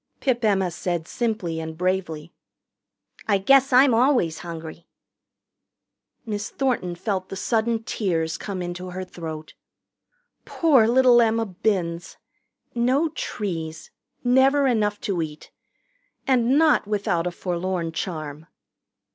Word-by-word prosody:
Pip 245 -3 0
Emma 195 -4 +2
said 170 -1 -3
simply 210 -9 -2
and 160 0 -6
bravely, 175 -3 -2 0.9
"I 205 -2 +3
guess 270 +7 +4
I'm 255 0 +6
always 235 - +2
hungry." 165 -1 -8 1.4
Miss 210 -1 -4
Thornton 240 -10 -1
felt 190 0 -3
the - - -5
sudden 225 +2 0
tears 165 -8 -1
come 185 +2 -5
into 175 +1 -6
her 185 +1 -5
throat. 160 -3 -8 0.9
Poor 275 -10 +3
little 245 0 +5
Emma 225 0 +2
Binns! 180 -4 -2 0.6
No 255 +7 +2
trees. 165 - -5 0.3
Never 265 +3 +4
enough 210 -5 +1
to 185 -4 -1
eat. 155 -1 -7 0.7
And 260 -1 +3
not 310 -8 +4
without 195 -5 0
a - - -2
forlorn 175 -1 -3
charm. 155 -3 -5
195 Hz, 115 wpm, -24 LUFS, 170-240 Hz, 1.4 s, I'm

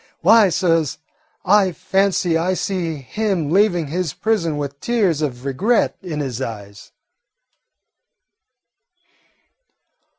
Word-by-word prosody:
Why, 220 -3 +6
suhs, 165 -5 +1 0.5
I 195 -1 +4
fancy 190 0 0
I 175 +3 0
see 180 -4 -2
him 170 +2 -2
leaving 185 -3 +2
his 160 +1 -3
prison 170 -9 -1
with 140 -1 -5
tears 200 -9 0
of 130 -4 -4
regret 200 - +1
in 160 -6 -4
his 130 -3 -4
eyes." 100 -4 -8
170 Hz, 100 wpm, -20 LUFS, 145-195 Hz, 0.5 s, Why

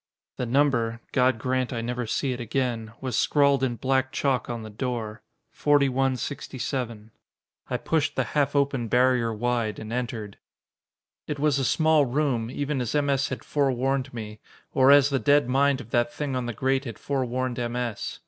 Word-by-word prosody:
The 125 - -2
number 120 -3 +2
God 130 -2 +3
grant 130 +2 -1
I 115 -3 -2
never 120 0 -3
see 135 +4 -1
it 125 - -4
again! 120 -2 -2
was 130 -3 -3
scrawled 140 -1 +3
in 125 -2 0
black 130 +2 0
chalk 135 -4 0
on 120 -2 -4
the 110 - -8
door 115 -1 -4 0.3
4167. 130 -4 -1 0.6
I - - 0
pushed 155 -1 0
the - - +1
half 145 -1 +1
open 140 -4 +1
barrier 125 0 +3
wide, 115 -1 -1
and 110 +1 -7
entered. 115 -5 -4 0.9
It 150 - -3
was 145 -1 +2
a - - 0
small 155 +2 +3
room, 125 -4 0
even 140 +1 -2
as 125 +3 -2
M. 145 -1 +2
S. 135 0 +1
had 130 - -5
forewarned 135 -1 0
me 110 -2 -7 0.3
or 135 -2 +5
as 145 0 +6
the 135 - +1
dead 145 -2 +3
mind 135 +1 +2
of 120 -3 -11
that 120 0 +2
thing 145 -3 -3
on 125 -1 -2
the 120 - -3
grate 135 +4 0
had 115 -4 -6
forewarned 130 -2 -2
M. 120 0 -2
S. 120 -4 -3
130 Hz, 175 wpm, -26 LUFS, 120-140 Hz, 0.9 s, as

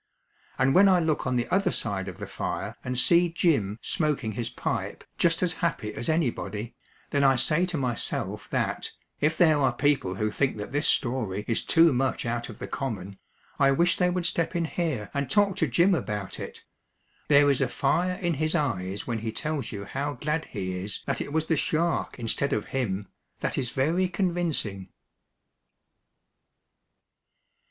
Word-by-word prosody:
And 130 +1 +3
when 195 +2 +7
I 185 -1 +5
look 160 -5 0
on 130 - 0
the 120 -1 0
other 195 +1 +2
side 100 -3 -2
of 90 - -7
the - - -6
fire - - -4
and 125 -1 -3
see 170 +7 +5
Jim 140 - +1
smoking 150 -8 0
his 115 +2 -3
pipe - - -3 0.2
just 170 0 +2
as 180 -1 +1
happy 110 -11 -1
as 120 - -3
anybody, 120 - -1 0.4
then 140 -1 +2
I 135 -1 +5
say 155 +8 +2
to 180 -3 -2
myself 125 -4 -2
that, - - -2 0.3
if 155 +2 +1
there 155 -4 +5
are 135 -2 +3
people 130 -8 +1
who 105 +2 -1
think 135 +2 0
that 105 - -6
this 145 +2 +1
story 110 -6 0
is 115 - +1
too 165 -2 +5
much 130 +1 0
out 120 +1 -2
of 110 - -9
the - - -6
common, 100 -8 -5 0.4
I 140 -1 +5
wish 170 +6 +3
they 180 -1 +3
would 180 -1 -1
step 165 +1 0
in 170 -1 +1
here 155 - -2
and 140 -1 -2
talk 205 -2 +3
to 160 - +2
Jim 170 +10 +4
about 105 - -3
it. - - -8 0.6
There 145 -1 +6
is 135 - +1
a 135 - +3
fire 175 +9 +1
in 175 -2 -1
his 155 +3 0
eyes 100 - -1
when 115 -2 -2
he 110 0 -3
tells 145 +2 -3
you 100 -1 -6
how 140 +6 -3
glad 150 +5 -2
he 95 -2 -4
is 100 +2 -4
that - - -1
it - - -5
was 160 +1 0
the 160 - +1
shark 165 +3 0
instead 120 +4 0
of 105 - -1
him, 100 -7 -1 0.3
that - - -1
is 125 -3 -1
very 165 +9 +1
convincing. 170 - -2
140 Hz, 180 wpm, -27 LUFS, 110-165 Hz, 0.6 s, when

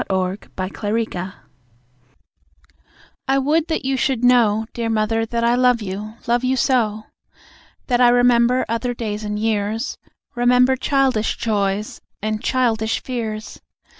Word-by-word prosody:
To 190 0 0 0.2
Mother 195 -1 -3 1.9
I 270 +1 +3
would 300 +4 +1
that 320 -4 -2
you 270 0 +1
should 260 -2 0
know, 225 -3 +4
Dear 230 -1 -2
mother, 225 +1 0
that 235 +1 -2
I 235 +1 +3
love 250 -1 +3
you 210 +3 -6
love 240 +1 +1
you 260 +1 +1
so! 220 -5 +1 0.8
That 245 -1 +1
I 245 - +7
remember 245 +1 +3
other 230 +2 -2
days 215 -2 -4
and 210 0 -3
years; 220 +2 -2 0.3
Remember 250 +1 +3
childish 260 -4 +1
joys 205 -2 -1 0.2
and 215 0 -2
childish 225 -4 +1
fears. 220 -4 -5
230 Hz, 130 wpm, -20 LUFS, 215-250 Hz, 1.9 s, I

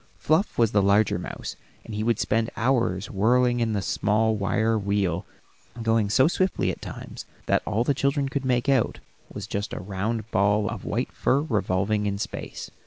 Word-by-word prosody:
Fluff 160 +7 +1
was 115 -2 +3
the 105 - +3
larger 100 -1 +3
mouse, - - -6 0.3
and 115 - -8
he 105 +1 -2
would 115 -1 +2
spend 115 +1 0
hours 115 -6 0
whirling 120 +4 +3
about 115 - +2
in 110 - -1
the 100 -2 -1
small 110 +2 +1
wire 105 +3 +1
wheel, 100 -4 -1 0.5
going 115 -2 +1
so 130 +6 +4
swiftly 175 - +1
at - - -9
times - - -8 0.2
that - - +2
all 110 +2 +1
the 140 - +2
children 140 +1 0
could 135 0 -3
make 125 -2 +1
out 135 -4 +2 0.3
was 100 - -6
just 100 -1 -4
a - - -4
round 105 +4 -3
ball 100 +2 +2
of 115 -3 -5
white 120 +5 -2
fur 135 - +1
revolving 105 -5 0
in 100 0 -1
space. 105 - -6
110 Hz, 185 wpm, -25 LUFS, 100-120 Hz, 0.5 s, so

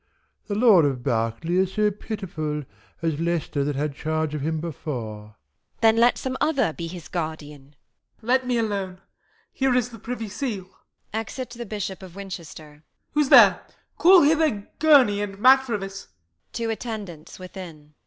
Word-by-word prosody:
The 205 - -2
Lord 210 -6 +6
of 130 -4 -1
Berkeley 115 +11 -1
is 190 0 +1
so 210 -1 +2
pitiful 170 -8 -5 0.4
As 160 -2 -1
Leicester 165 -4 -1
that 145 0 -2
had 145 +1 -2
charge 155 +1 -2
of 150 - -3
him 160 +2 -1
before. 125 -9 -5
Q. - - -16
Isab. 70 -2 -46
Then 225 0 +5
let 240 +1 +4
some 260 -1 -4
other 275 - +1
be 170 +1 -5
his 170 -1 -9
guardian. 150 -4 -6 0.5
Y. - - -15
Mor. - - -12
Let 255 +1 +2
me 245 -1 +1
alone; 200 -4 -2 0.5
here 265 -2 +1
is 250 -1 +1
the 230 -2 -12
privy 230 0 -5
seal, 205 -3 -5 0.4
[Exit 225 +4 -4
the 235 -1 -7
Bish. 205 -2 -3
of 190 -2 -11
Win. 195 -1 -8 0.8
Who's 300 -3 +2
there? - - +8 0.4
Call 365 0 +7
hither, 300 -9 +2
Gurney 275 -10 +5
and 200 -1 -5
Matrevis. 210 -5 +2 0.5
[_To 230 -1 -2
Attendants 210 -9 -7
within. 175 -5 -10
195 Hz, 165 wpm, -24 LUFS, 155-230 Hz, 0.8 s, there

